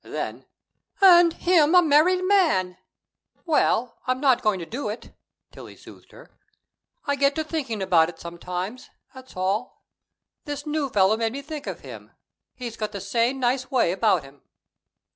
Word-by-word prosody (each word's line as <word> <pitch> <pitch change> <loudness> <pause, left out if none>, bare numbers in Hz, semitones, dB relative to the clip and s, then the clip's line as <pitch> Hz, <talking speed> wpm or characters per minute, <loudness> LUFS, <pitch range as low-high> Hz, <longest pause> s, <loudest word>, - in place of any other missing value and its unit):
Then: - - -6 0.5
"And 350 -3 +7
him 335 -1 +2
a 360 - +8
married 335 +5 +3
man!" 320 - +1 0.7
"Well, 250 -7 +1
I'm 255 0 0
not 260 -3 +3
going 215 -5 +1
to 170 - -7
do 240 +4 -5
it," 215 - -8 0.4
Tillie - - -12
soothed - - -16
her. - - -16 0.7
"I 285 - 0
get 280 0 +1
to 315 - -1
thinking 265 - -4
about 170 -3 +3
it - - -11
sometimes; 180 +7 -6 0.2
that's 260 -6 -14
all. 195 +6 -3 0.6
This 290 -1 -6
new 300 -2 -2
fellow 205 -1 +3
made 225 0 -1
me 280 +1 -6
think 305 0 -8
of - - -6
him. - - -12 0.4
He's 240 -3 -7
got 215 -1 -4
the 200 - -5
same 235 +7 -1
nice 255 +1 -1
way 250 -10 +2
about 190 -4 +1
him." 135 0 -17
255 Hz, 160 wpm, -24 LUFS, 200-300 Hz, 0.7 s, a